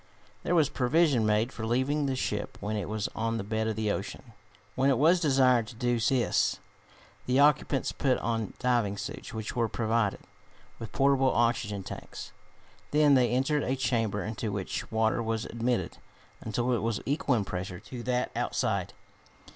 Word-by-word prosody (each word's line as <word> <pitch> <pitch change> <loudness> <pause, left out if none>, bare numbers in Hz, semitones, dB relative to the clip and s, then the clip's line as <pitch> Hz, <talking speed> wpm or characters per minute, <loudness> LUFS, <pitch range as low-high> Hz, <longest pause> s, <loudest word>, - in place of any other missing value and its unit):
There 175 - 0
was 155 -4 +4
provision 135 -3 +2
made 110 +4 +1
for 110 - -6
leaving 130 +6 +1
the 135 - -1
ship 105 -5 -3
when 105 +1 -3
it 105 -3 -3
was 110 -1 -2
on 115 +1 -1
the 115 - -3
bed 110 +2 -1
of 110 - -1
the 110 -1 0
ocean. 100 +4 -6 0.4
When 135 +4 +2
it 135 - +3
was 165 +7 +5
desired 130 -7 +3
to 115 - -10
do 120 +1 0
this 120 +2 +2 0.7
the 125 +1 +2
occupants 145 -1 +3
put 130 -2 +1
on 115 -3 -2
diving 120 -5 +1
suits, - - -6
which 110 +1 -5
were 115 -2 +1
provided 110 0 0 0.6
with 115 - -7
portable 135 -1 +3
oxygen 115 -4 0
tanks. - - -8 0.6
Then 150 -1 +4
they 125 -2 +4
entered 135 +4 +1
a 130 - -1
chamber 115 -6 0
into 110 0 -4
which 100 0 -4
water 110 +1 +1
was 110 0 -2
admitted 120 +1 -2 0.4
until 120 +3 -1
it 120 - +1
was 115 -2 -1
equal 140 -1 +1
in 105 -4 0
pressure 90 0 -5
to 125 +4 -8
that 125 +1 -1
outside. - - -1
120 Hz, 170 wpm, -29 LUFS, 110-130 Hz, 0.7 s, was